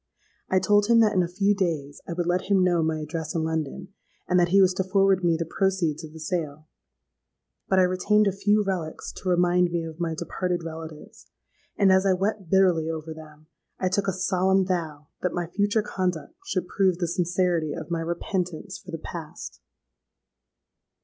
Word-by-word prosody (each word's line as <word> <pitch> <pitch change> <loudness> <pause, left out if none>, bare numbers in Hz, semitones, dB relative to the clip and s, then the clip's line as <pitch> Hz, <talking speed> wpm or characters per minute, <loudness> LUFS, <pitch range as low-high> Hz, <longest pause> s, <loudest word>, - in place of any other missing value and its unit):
I 190 - +3
told 205 +2 +3
him 230 0 +5
that 215 -1 +3
in 185 - +3
a 175 - 0
few 195 +4 +1
days 160 -8 -2
I - - -3
would 175 0 -2
let 180 +2 -1
him 195 -2 +4
know 175 -2 +2
my 160 0 0
address 155 +1 -5
in 160 - 0
London; 160 -3 -3 0.4
and 180 0 +3
that 175 - +4
he 195 +3 +4
was 190 -1 +5
to 190 - -1
forward 195 0 +2
me 170 -1 +3
the 165 - -2
proceeds 175 -3 0
of 155 - -9
the 160 - -11
sale. 155 -2 -4 1.0
But 190 - +3
I 185 - +6
retained 190 +4 +2
a 200 - +2
few 205 +2 +2
relics 180 -5 -4
to 185 - -4
remind 180 0 +3
me 170 -1 -1
of 160 0 -8
my 165 -2 -1
departed 175 +1 -3
relatives; 160 -1 -9 0.5
and 195 -2 +5
as 190 +1 +4
I 190 - +4
wept 195 -1 -2
bitterly 180 -4 +3
over 160 0 -5
them, 155 -1 -14 0.3
I 185 - +1
took 200 +1 0
a - - +2
solemn 190 +1 +1
vow 160 -5 -3
that 180 - -1
my 175 -1 -1
future 205 +5 0
conduct 185 - -3
should 180 -2 -2
prove 190 -3 +1
the 175 -1 -1
sincerity 175 -2 0
of - - -7
my 170 - 0
repentance 175 +2 -3
for 190 - -16
the 165 - -4
past! 155 - -8
180 Hz, 195 wpm, -25 LUFS, 165-190 Hz, 1.0 s, I